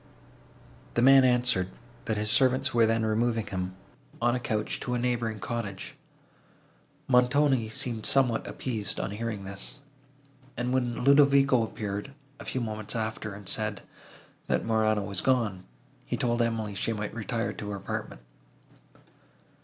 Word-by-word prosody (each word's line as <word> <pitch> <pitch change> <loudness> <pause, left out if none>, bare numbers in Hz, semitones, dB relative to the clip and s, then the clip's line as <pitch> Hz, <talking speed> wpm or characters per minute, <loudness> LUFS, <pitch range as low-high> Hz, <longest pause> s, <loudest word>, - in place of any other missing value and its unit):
The 120 - +3
man 135 0 +8
answered, 125 -7 +2 0.4
that 110 -2 -1
his 105 0 -1
servants 130 +2 +3
were 115 -1 +5
then 115 0 +1
removing 115 0 +1
him, 95 -1 -4 0.4
on 120 0 +2
a 125 - 0
couch, 110 -3 -2
to 125 - -2
a - - +1
neighbouring 120 -3 -1
cottage. 110 -3 -4 1.1
Montoni 125 -1 +3
seemed 115 0 -1
somewhat 125 -5 +3
appeased, 110 -5 -3
on - - -2
hearing 105 -1 -4
this; 100 +8 -5 0.8
and, 125 +1 -1
when 125 -2 0
Ludovico 140 -2 +5
appeared, 105 +3 -4 0.2
a - - -9
few 130 - -2
moments 110 -1 -4
after, 110 -2 -3
and 100 -2 -11
said, 105 0 -2 0.6
that - - 0
Morano 110 -2 +2
was 100 -2 -2
gone, 110 -8 +1 0.4
he - - -3
told 120 -1 +1
Emily 115 -3 -1
she 115 +3 0
might 105 -1 -4
retire 115 +1 -2
to 105 - -6
her 100 - -3
apartment. 95 -9 -5
115 Hz, 145 wpm, -28 LUFS, 105-125 Hz, 1.1 s, man